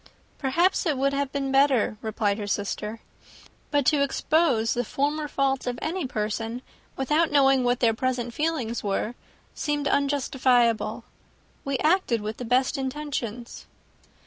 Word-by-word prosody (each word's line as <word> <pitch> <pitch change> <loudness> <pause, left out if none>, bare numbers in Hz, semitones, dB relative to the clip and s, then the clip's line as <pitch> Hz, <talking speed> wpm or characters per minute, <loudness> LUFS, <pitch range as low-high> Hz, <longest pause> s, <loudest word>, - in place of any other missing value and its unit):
"Perhaps 340 +8 +2
it 300 -4 +1
would 275 +1 +1
have 280 -1 -1
been 275 -1 -2
better," 270 -5 +3
replied 215 -1 -1
her 205 - -4
sister. 210 +2 -3 0.7
"But 290 -2 +1
to 290 +2 +3
expose 280 -4 +2
the 245 - -1
former 295 +5 -1
faults 270 -2 0
of 245 -1 -2
any 330 -2 -2
person, 225 +2 -3 0.3
without 300 +5 +2
knowing 270 -2 +4
what 245 0 +1
their 230 -2 +4
present 245 0 -2
feelings 295 -7 -2
were, 205 +3 -1 0.4
seemed 295 -1 -1
unjustifiable." 260 -5 +1 0.6
"We 275 -1 -1
acted 310 - +2
with 215 +1 -5
the 250 - -5
best 255 +4 +1
intentions." 260 -4 -5
265 Hz, 140 wpm, -25 LUFS, 235-285 Hz, 0.7 s, knowing